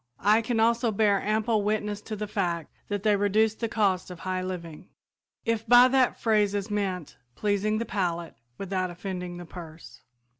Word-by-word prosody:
I 215 +2 +5
can 230 0 -1
also 235 +1 +3
bear 205 -1 +2
ample 215 +1 +1
witness 210 0 -1
to 215 - -2
the 210 0 -4
fact 175 -6 -2 0.2
that 205 -1 -3
they 210 -1 +4
reduce 205 +2 +2
the 230 +1 -4
cost 195 -5 +1
of 180 -2 -9
high 185 0 -2
living, 175 -4 -7 0.6
if 230 -1 -1
by 245 +2 +8
that 260 -1 +2
phrase 210 -3 +2
is 205 +1 -3
meant 190 -5 -3 0.2
pleasing 210 +1 0
the 230 - -2
palate 175 -5 -2 0.2
without 185 -1 -2
offending 180 0 -6
the 175 - -8
purse. 165 -2 -11
205 Hz, 175 wpm, -27 LUFS, 185-220 Hz, 0.6 s, by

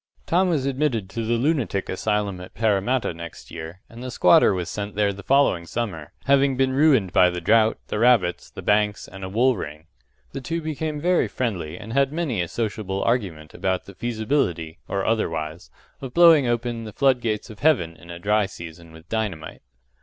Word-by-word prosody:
Tom 180 +2 +2
was 150 -6 0
admitted 130 -8 -1
to 115 - -3
the 115 +2 +1
lunatic 125 - 0
asylum 100 -1 -1
at 90 - -12
Parramatta 110 +1 +1
next 85 0 -10
year, 85 +3 -8
and 115 +1 -12
the 130 - -5
squatter 90 -6 +5
was 90 -3 -2
sent 105 -1 -5
there 100 -1 +1
the 100 - -9
following 115 -10 +2
summer, 95 -11 -4
having 140 -1 +3
been 130 0 +2
ruined 135 - +3
by 90 - +6
the 90 0 -4
drought, 110 +5 +3
the 105 - -2
rabbits, 110 -8 +3
the - - -10
banks, 105 0 +1
and 95 +1 -10
a 95 - -4
wool 120 +6 +3
ring. 75 -4 -7 0.5
The 135 - -6
two 165 +5 -3
became 155 -1 -3
very 175 +3 +2
friendly, 90 -10 -3
and 110 +3 -8
had 140 0 +2
many 150 - -1
a 85 - -2
sociable 105 -2 -3
argument 90 -11 -1
about 95 -1 -2
the 100 - -12
feasibility 110 - -2
or 100 0 -2
otherwise 80 -7 -2 0.3
of 130 -2 -7
blowing 165 -6 +7
open 120 -1 -2
the 105 - -8
flood 135 -3 +2
gates 110 0 -3
of 105 - -13
Heaven 90 - +2
in 85 - -16
a 85 - -7
dry 105 +3 +1
season 85 -1 -11
with 80 +1 -15
dynamite. 100 -9 -4
110 Hz, 190 wpm, -23 LUFS, 90-130 Hz, 0.5 s, blowing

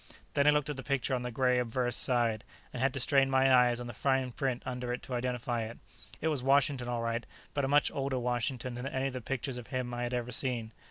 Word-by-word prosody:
Then 140 +1 +3
I - - +9
looked 150 -2 +3
at 145 - -6
the - - -4
picture 140 -1 -1
on 125 - 0
the 125 - -3
gray 125 +1 +2
obverse 120 0 0
side, 120 -4 +2 0.3
and 125 - -4
had 135 0 +3
to - - -1
strain 135 +1 +4
my 130 0 +4
eyes 125 -1 +5
on 120 - -5
the 120 - -6
fine 130 +2 +1
print 130 -1 -2
under 125 -1 -3
it 125 - -4
to 130 - -6
identify 125 -1 -1
it. 110 +1 -5 0.4
It 160 - 0
was 150 -5 -1
Washington, 135 -1 +3
all 120 -1 -1
right, 115 0 -1 0.3
but 140 -2 0
a - - 0
much 145 +1 +4
older 135 -1 -1
Washington 125 +1 -1
than 125 +2 -4
any 135 0 -1
of - - -9
the 130 - -4
pictures 130 +2 -3
of 120 - -10
him 125 -2 -3
I 120 - -3
had 120 0 -2
ever 120 0 -3
seen. 120 -3 -2
125 Hz, 260 wpm, -31 LUFS, 120-135 Hz, 0.4 s, I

